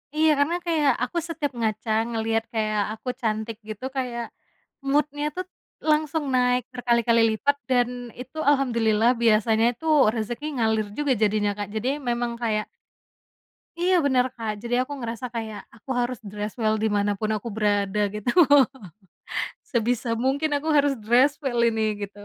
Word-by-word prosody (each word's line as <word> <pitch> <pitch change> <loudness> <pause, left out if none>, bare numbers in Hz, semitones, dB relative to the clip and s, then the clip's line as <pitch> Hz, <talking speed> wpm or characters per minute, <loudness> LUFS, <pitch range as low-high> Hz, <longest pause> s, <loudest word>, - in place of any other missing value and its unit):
Iya, 315 0 +4
karena 310 +4 +2
kayak 310 -4 +3
aku 255 +8 -3
setiap 305 -4 -2
ngaca 220 0 -1 0.2
ngelihat 225 -1 0
kayak 215 -1 0
aku 250 +3 -6
cantik 220 -1 -2
gitu 215 +4 -6
kayak, 240 -2 -2 0.7
mood-nya 290 +1 +1
tuh, 370 0 -3 0.5
langsung 305 0 +1
naik 250 0 +2
berkali-kali 235 -2 +2
lipat 285 +6 +1
dan 245 -2 +3 0.3
itu 260 +5 -9
alhamdulillah 235 -5 +3
biasanya 220 0 +4
itu 245 +7 -13 0.3
rezeki 235 +5 -4
ngalir 220 -3 +1
juga 290 -2 +2
jadinya 210 0 +2
Kak 205 -1 -3
jadi 225 +4 -1 0.2
memang 240 0 -1
kayak 215 -2 0 1.1
iya, 365 +2 +3
benar 255 -2 +3
Kak 215 -3 -4
jadi 245 +2 0
aku 285 - -7
ngerasa 235 0 -5
kayak 220 -2 -4
aku 230 +4 -20
harus 245 -1 -1
dress 210 0 -4
well 215 -1 +2
di 220 - +2
mana 205 0 +1
pun 215 0 -1
aku 215 +1 -3
berada 205 -1 +1
gitu. 210 +3 -2 1.3
Sebisa 235 0 -1
mungkin 270 +6 0
aku 305 +3 -3
harus 285 -1 +3
dress 245 +6 +3
well 245 -4 0
ini 220 -2 -1
gitu. 205 +1 -17
235 Hz, 150 wpm, -25 LUFS, 215-265 Hz, 1.3 s, Iya